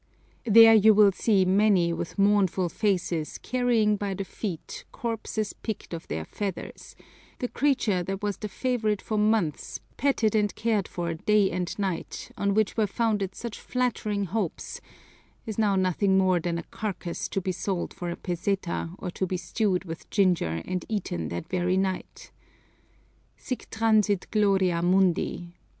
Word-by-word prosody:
There 225 Hz, +1 st, +9 dB
you 220 Hz, 0 st, +6 dB
will 205 Hz, -1 st, +7 dB
see 195 Hz, -1 st, +2 dB
many 190 Hz, -3 st, +3 dB
with 170 Hz, -, -5 dB
mournful 195 Hz, -3 st, +3 dB
faces 175 Hz, -6 st, -1 dB
carrying 235 Hz, -4 st, +1 dB
by 200 Hz, -1 st, -3 dB
the 195 Hz, +1 st, -4 dB
feet 185 Hz, -5 st, -6 dB
corpses 225 Hz, -2 st, -3 dB
picked 220 Hz, -5 st, -6 dB
of 165 Hz, -, -6 dB
their 80 Hz, +1 st, -4 dB
feathers; 195 Hz, -, -6 dB, 0.4 s
the 250 Hz, -, -2 dB
creature 245 Hz, -9 st, +1 dB
that 195 Hz, +3 st, -4 dB
was 205 Hz, -1 st, -1 dB
the 210 Hz, -, -5 dB
favorite 220 Hz, -2 st, 0 dB
for 215 Hz, -1 st, -2 dB
months, 210 Hz, -7 st, 0 dB, 0.2 s
petted 250 Hz, -6 st, +2 dB
and 210 Hz, -1 st, +1 dB
cared 220 Hz, -4 st, 0 dB
for 170 Hz, -1 st, -3 dB
day 205 Hz, +4 st, +2 dB
and 180 Hz, 0 st, -3 dB
night, 190 Hz, -5 st, -4 dB
on 200 Hz, 0 st, 0 dB
which 215 Hz, -2 st, +1 dB
were 220 Hz, -2 st, +2 dB
founded 205 Hz, -2 st, -1 dB
such 235 Hz, -3 st, -6 dB
flattering 215 Hz, -5 st, -1 dB
hopes, 190 Hz, -1 st, -3 dB, 0.6 s
is 220 Hz, -1 st, -4 dB
now 205 Hz, -3 st, +3 dB
nothing 190 Hz, +1 st, +2 dB
more 185 Hz, -2 st, +3 dB
than 170 Hz, 0 st, -2 dB
a 170 Hz, -, -4 dB
carcass 185 Hz, -5 st, -5 dB
to -, -, -1 dB
be 185 Hz, 0 st, -2 dB
sold 185 Hz, 0 st, -3 dB
for 175 Hz, -, -5 dB
a 170 Hz, -, -3 dB
peseta 180 Hz, -1 st, -2 dB
or 180 Hz, -, -5 dB
to 190 Hz, -, -2 dB
be 185 Hz, -, -2 dB
stewed 190 Hz, 0 st, -1 dB
with 165 Hz, -1 st, -8 dB
ginger 165 Hz, -, +1 dB
and 185 Hz, -1 st, -3 dB
eaten 175 Hz, -, -2 dB
that 85 Hz, 0 st, -5 dB
very 180 Hz, 0 st, 0 dB
night. 190 Hz, -1 st, -3 dB, 1.1 s
_Sic 255 Hz, -, -6 dB
transit 215 Hz, -3 st, +2 dB
gloria 195 Hz, -5 st, +2 dB
mundi! 175 Hz, -1 st, +1 dB
195 Hz, 155 wpm, -27 LUFS, 180-215 Hz, 1.1 s, There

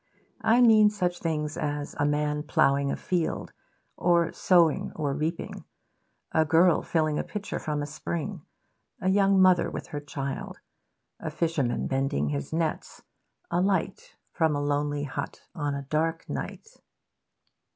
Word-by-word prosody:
I 235 Hz, +3 st, +4 dB
mean 215 Hz, -3 st, +7 dB
such 180 Hz, -4 st, -2 dB
things 150 Hz, -2 st, -2 dB
as 145 Hz, -1 st, -3 dB
a 145 Hz, -, +3 dB
man 150 Hz, 0 st, 0 dB
ploughing 140 Hz, -2 st, +2 dB
a -, -, -1 dB
field, 175 Hz, -3 st, -2 dB, 0.4 s
or 170 Hz, -1 st, +2 dB
sowing 170 Hz, -4 st, +3 dB
or 145 Hz, -3 st, -1 dB
reaping; 155 Hz, +4 st, -3 dB, 0.7 s
a 160 Hz, -, +3 dB
girl 165 Hz, +3 st, +4 dB
filling 155 Hz, -2 st, 0 dB
a -, -, -1 dB
pitcher 205 Hz, -1 st, -5 dB
from 150 Hz, -1 st, -2 dB
a -, -, -2 dB
spring; 165 Hz, +4 st, -4 dB, 0.6 s
a 185 Hz, -, 0 dB
young 195 Hz, 0 st, +4 dB
mother 185 Hz, -2 st, +5 dB
with -, -, -7 dB
her 145 Hz, -, -4 dB
child; 140 Hz, -2 st, -5 dB, 0.6 s
a -, -, -4 dB
fisherman 155 Hz, -8 st, -1 dB
mending 135 Hz, -, 0 dB
his 70 Hz, -1 st, -3 dB
nets; 160 Hz, -1 st, -3 dB, 0.5 s
a 175 Hz, +1 st, +2 dB
light 190 Hz, -1 st, -1 dB, 0.2 s
from 160 Hz, -3 st, +1 dB
a -, -, 0 dB
lonely 145 Hz, 0 st, 0 dB
hut 145 Hz, 0 st, -5 dB
on 145 Hz, -2 st, -2 dB
a 140 Hz, -, -4 dB
dark 160 Hz, +3 st, -1 dB
night. 440 Hz, -, -6 dB
155 Hz, 145 wpm, -27 LUFS, 145-175 Hz, 0.7 s, mean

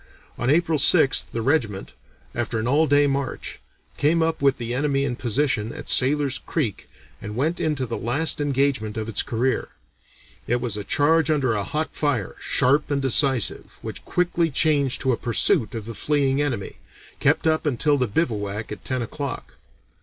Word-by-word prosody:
On 120 Hz, -, -2 dB
April 160 Hz, 0 st, +2 dB
6th 145 Hz, -1 st, +4 dB
the 115 Hz, -, -4 dB
regiment, 115 Hz, -8 st, -1 dB, 0.4 s
after 120 Hz, -1 st, -2 dB
an 110 Hz, +1 st, -2 dB
all 150 Hz, +5 st, +3 dB
day 145 Hz, 0 st, +4 dB
march, 140 Hz, -1 st, -3 dB, 0.4 s
came 160 Hz, +3 st, +2 dB
up 160 Hz, -2 st, -1 dB
with 140 Hz, -1 st, +3 dB
the 120 Hz, -1 st, -4 dB
enemy 140 Hz, +1 st, 0 dB
in 125 Hz, -3 st, -2 dB
position 120 Hz, -2 st, -1 dB
at -, -, -9 dB
Sailor's 140 Hz, +1 st, +2 dB
Creek, 130 Hz, -, -3 dB, 0.3 s
and 105 Hz, 0 st, -7 dB
went 155 Hz, +8 st, -1 dB
into 150 Hz, -4 st, -1 dB
the 115 Hz, -, -5 dB
last 145 Hz, +6 st, 0 dB
engagement 135 Hz, -6 st, 0 dB
of 110 Hz, 0 st, -3 dB
its 115 Hz, -, 0 dB
career. 125 Hz, +3 st, -1 dB, 0.8 s
It 120 Hz, +1 st, +1 dB
was 120 Hz, -3 st, -3 dB
a 105 Hz, -, -4 dB
charge 150 Hz, -, +2 dB
under 140 Hz, -6 st, +1 dB
a 105 Hz, -, -1 dB
hot 155 Hz, +8 st, -3 dB
fire, 135 Hz, -10 st, -1 dB
sharp 140 Hz, +4 st, +2 dB
and 145 Hz, -1 st, 0 dB
decisive, 135 Hz, -2 st, +1 dB
which -, -, -7 dB
quickly 175 Hz, -2 st, 0 dB
changed 140 Hz, -3 st, +1 dB
to 130 Hz, -, +1 dB
a 120 Hz, -, 0 dB
pursuit 115 Hz, 0 st, +3 dB
of 110 Hz, -2 st, -5 dB
the 115 Hz, -, -6 dB
fleeing 140 Hz, +2 st, 0 dB
enemy, 120 Hz, -9 st, -3 dB, 0.4 s
kept -, -, +2 dB
up 155 Hz, 0 st, +1 dB
until 145 Hz, +2 st, +1 dB
the 125 Hz, -, +1 dB
bivouack 105 Hz, -5 st, -2 dB
at 105 Hz, -3 st, -7 dB
ten 130 Hz, -2 st, -2 dB
o'clock. 140 Hz, +4 st, -6 dB
135 Hz, 175 wpm, -23 LUFS, 115-150 Hz, 0.8 s, 6th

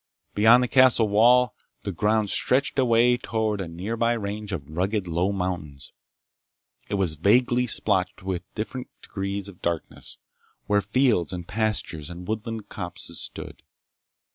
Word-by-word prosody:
Beyond 115 Hz, +4 st, +6 dB
the -, -, 0 dB
castle 130 Hz, -3 st, +5 dB
wall 120 Hz, +4 st, +5 dB, 0.3 s
the 100 Hz, -, -3 dB
ground 105 Hz, +2 st, +1 dB
stretched 135 Hz, +1 st, +1 dB
away 120 Hz, -1 st, +4 dB
toward 110 Hz, -4 st, -1 dB
a 95 Hz, -, -4 dB
nearby 110 Hz, +8 st, -1 dB
range 105 Hz, -1 st, -4 dB
of 75 Hz, -7 st, -4 dB
rugged 95 Hz, +2 st, -1 dB
low 85 Hz, +4 st, 0 dB
mountains. 90 Hz, -7 st, -4 dB, 1.0 s
It -, -, -1 dB
was 90 Hz, -6 st, -1 dB
vaguely 120 Hz, -, +3 dB
splotched 100 Hz, -4 st, -1 dB
with 95 Hz, -2 st, -2 dB
different 125 Hz, +4 st, -4 dB, 0.2 s
degrees 100 Hz, 0 st, -4 dB
of 100 Hz, -3 st, -13 dB
darkness, 85 Hz, -2 st, -4 dB, 0.5 s
where 105 Hz, 0 st, +2 dB
fields 110 Hz, -3 st, +2 dB
and 90 Hz, -2 st, -6 dB
pastures 105 Hz, -7 st, -2 dB
and 90 Hz, +1 st, -9 dB
woodland 110 Hz, 0 st, -4 dB
copses 90 Hz, -3 st, -4 dB
stood. -, -, -6 dB
105 Hz, 140 wpm, -25 LUFS, 90-115 Hz, 1.0 s, Beyond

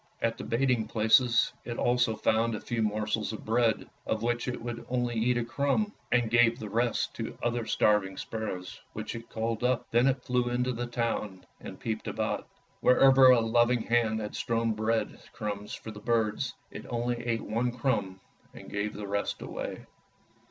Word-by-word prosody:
At 115 Hz, 0 st, 0 dB
the -, -, -5 dB
baiting 120 Hz, -2 st, +1 dB
places 115 Hz, +2 st, +4 dB
it 120 Hz, -1 st, -5 dB
also 120 Hz, -2 st, +2 dB
found 115 Hz, +1 st, +1 dB
a -, -, -4 dB
few 120 Hz, -1 st, -3 dB
morsels 110 Hz, +1 st, -1 dB
of 110 Hz, -, -8 dB
bread, 115 Hz, 0 st, +1 dB, 0.2 s
of 110 Hz, 0 st, -1 dB
which 120 Hz, +1 st, 0 dB
it 125 Hz, -, -3 dB
would 120 Hz, 0 st, -5 dB
only 120 Hz, -1 st, 0 dB
eat 120 Hz, +2 st, +1 dB
a 120 Hz, -, 0 dB
crumb, 140 Hz, -, 0 dB, 0.2 s
and 120 Hz, -2 st, +2 dB
gave 120 Hz, 0 st, +5 dB
the 105 Hz, -2 st, -7 dB
rest 120 Hz, +1 st, 0 dB
to -, -, -2 dB
the -, -, -8 dB
other 120 Hz, -1 st, -1 dB
starving 100 Hz, -3 st, +2 dB
sparrows 95 Hz, -5 st, -5 dB
which -, -, -5 dB
it 115 Hz, 0 st, -8 dB
called 115 Hz, +1 st, -2 dB
up. 125 Hz, -1 st, +1 dB
Then 120 Hz, +3 st, +4 dB
it 130 Hz, -2 st, +1 dB
flew 125 Hz, -1 st, +1 dB
into 125 Hz, +1 st, 0 dB
the 120 Hz, +1 st, -3 dB
town 115 Hz, -5 st, -2 dB
and -, -, -9 dB
peeped 110 Hz, -1 st, -3 dB
about. -, -, -2 dB, 0.3 s
Wherever 130 Hz, +1 st, +6 dB
a 125 Hz, -2 st, +6 dB
loving 120 Hz, +1 st, +3 dB
hand 115 Hz, -2 st, +2 dB
had 105 Hz, -, -5 dB
strewn 115 Hz, -1 st, 0 dB
bread 110 Hz, +1 st, -1 dB
crumbs 105 Hz, -1 st, -4 dB
for 110 Hz, -, -8 dB
the 105 Hz, -, -9 dB
birds, 115 Hz, +2 st, 0 dB, 0.2 s
it -, -, -9 dB
only 120 Hz, 0 st, -1 dB
ate 115 Hz, -2 st, -1 dB
one 115 Hz, +3 st, -1 dB
crumb 105 Hz, -7 st, -1 dB, 0.4 s
and -, -, -11 dB
gave 100 Hz, +1 st, -2 dB
the 105 Hz, -, -5 dB
rest 100 Hz, +1 st, -2 dB
away. -, -, -6 dB
115 Hz, 185 wpm, -29 LUFS, 110-120 Hz, 0.4 s, Wherever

